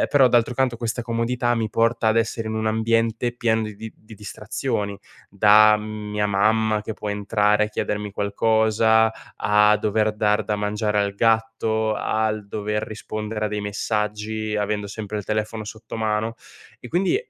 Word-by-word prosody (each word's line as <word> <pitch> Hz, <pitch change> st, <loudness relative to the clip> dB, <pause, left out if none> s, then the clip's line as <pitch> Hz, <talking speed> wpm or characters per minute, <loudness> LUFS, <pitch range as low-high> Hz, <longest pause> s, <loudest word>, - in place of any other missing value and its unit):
ehm, -, -, +2 dB
però, 135 Hz, -3 st, +5 dB
d'altro 120 Hz, 0 st, +2 dB
canto, 130 Hz, -2 st, 0 dB
questa 115 Hz, +1 st, -3 dB
comodità 120 Hz, +1 st, 0 dB
mi 115 Hz, -2 st, -1 dB
porta 115 Hz, 0 st, +1 dB
ad 110 Hz, -, +2 dB
essere 115 Hz, 0 st, 0 dB
in 110 Hz, -, -3 dB
un 110 Hz, 0 st, -2 dB
ambiente 115 Hz, +2 st, +1 dB
pieno 115 Hz, -2 st, 0 dB
di 105 Hz, -1 st, -5 dB
di 110 Hz, +1 st, -8 dB
di 110 Hz, 0 st, -15 dB
distrazioni: 100 Hz, 0 st, -4 dB, 0.3 s
da 105 Hz, +1 st, +6 dB
mia 105 Hz, -1 st, -3 dB
mamma 110 Hz, +2 st, +2 dB
che 110 Hz, -, -5 dB
può 105 Hz, -, -6 dB
entrare 105 Hz, +1 st, +1 dB
e -, -, -4 dB
chiedermi 105 Hz, -1 st, -3 dB
qualcosa, 110 Hz, +2 st, +2 dB, 0.3 s
a 105 Hz, 0 st, +4 dB
dover 110 Hz, 0 st, +1 dB
dar 105 Hz, 0 st, +1 dB
da 105 Hz, -, -1 dB
mangiare 105 Hz, 0 st, -1 dB
al 100 Hz, -1 st, 0 dB
gatto, 110 Hz, 0 st, +1 dB
al 110 Hz, -1 st, -1 dB
dover 105 Hz, +1 st, -3 dB
rispondere 110 Hz, 0 st, -4 dB
a -, -, -3 dB
dei 105 Hz, 0 st, -3 dB
messaggi, 105 Hz, +1 st, -2 dB
avendo 105 Hz, 0 st, -1 dB
sempre 105 Hz, +1 st, -6 dB
il 105 Hz, -, -4 dB
telefono 110 Hz, 0 st, -3 dB
sotto 110 Hz, +2 st, -8 dB
mano. 110 Hz, +1 st, -1 dB, 0.4 s
E, -, -, -10 dB
quindi, 180 Hz, +3 st, +1 dB
110 Hz, 165 wpm, -23 LUFS, 105-110 Hz, 0.4 s, da